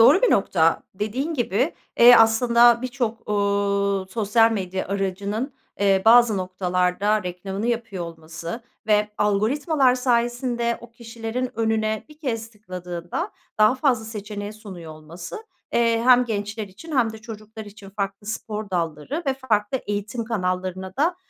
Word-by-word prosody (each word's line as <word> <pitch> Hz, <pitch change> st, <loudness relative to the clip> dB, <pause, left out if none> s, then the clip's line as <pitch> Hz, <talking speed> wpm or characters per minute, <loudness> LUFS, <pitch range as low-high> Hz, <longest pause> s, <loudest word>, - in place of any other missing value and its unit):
doğru 275 Hz, -, +7 dB
bir -, -, +4 dB
nokta 165 Hz, -4 st, +3 dB
dediğin 250 Hz, -, -2 dB
gibi, 240 Hz, -, 0 dB, 0.2 s
eee, 240 Hz, +1 st, +10 dB
aslında 235 Hz, +1 st, +5 dB
birçok, 240 Hz, -3 st, -3 dB
uuu, 200 Hz, -1 st, +1 dB
sosyal 225 Hz, +1 st, +3 dB
medya 190 Hz, -3 st, -3 dB
aracının, 200 Hz, +6 st, -2 dB, 0.3 s
eee, 195 Hz, -1 st, +3 dB
bazı 230 Hz, -2 st, +6 dB
noktalarda 185 Hz, +2 st, 0 dB
reklamını 190 Hz, +4 st, -4 dB
yapıyor 225 Hz, -7 st, -2 dB
olması 165 Hz, +5 st, -7 dB, 0.2 s
ve 210 Hz, 0 st, +3 dB
algoritmalar 255 Hz, -, +2 dB
sayesinde 240 Hz, -1 st, 0 dB
o 240 Hz, -, -13 dB
kişilerin 235 Hz, +1 st, -5 dB
önüne 220 Hz, -1 st, 0 dB
1 300 Hz, -, -16 dB
kez 230 Hz, -7 st, -3 dB
tıkladığında 185 Hz, -, -6 dB, 0.3 s
daha 215 Hz, +4 st, +6 dB
fazla 255 Hz, -4 st, +1 dB
seçeneği 210 Hz, -1 st, -6 dB
sunuyor 190 Hz, -7 st, -10 dB
olması, 170 Hz, -, -9 dB, 0.3 s
eee, 230 Hz, -1 st, +3 dB
hem 250 Hz, 0 st, +6 dB
gençler 205 Hz, -1 st, -4 dB
için 280 Hz, -, -7 dB
hem 225 Hz, -3 st, +2 dB
de 220 Hz, -, -9 dB
çocuklar 220 Hz, 0 st, -9 dB
için 205 Hz, -1 st, -12 dB
farklı 200 Hz, 0 st, -4 dB
spor 215 Hz, -1 st, -4 dB
dalları 170 Hz, -, -2 dB
ve 270 Hz, -, +2 dB
farklı 230 Hz, -2 st, 0 dB
eğitim 205 Hz, +3 st, -3 dB
kanallarına 185 Hz, -2 st, -3 dB
da, 335 Hz, +5 st, +2 dB
215 Hz, 135 wpm, -23 LUFS, 195-240 Hz, 0.3 s, eee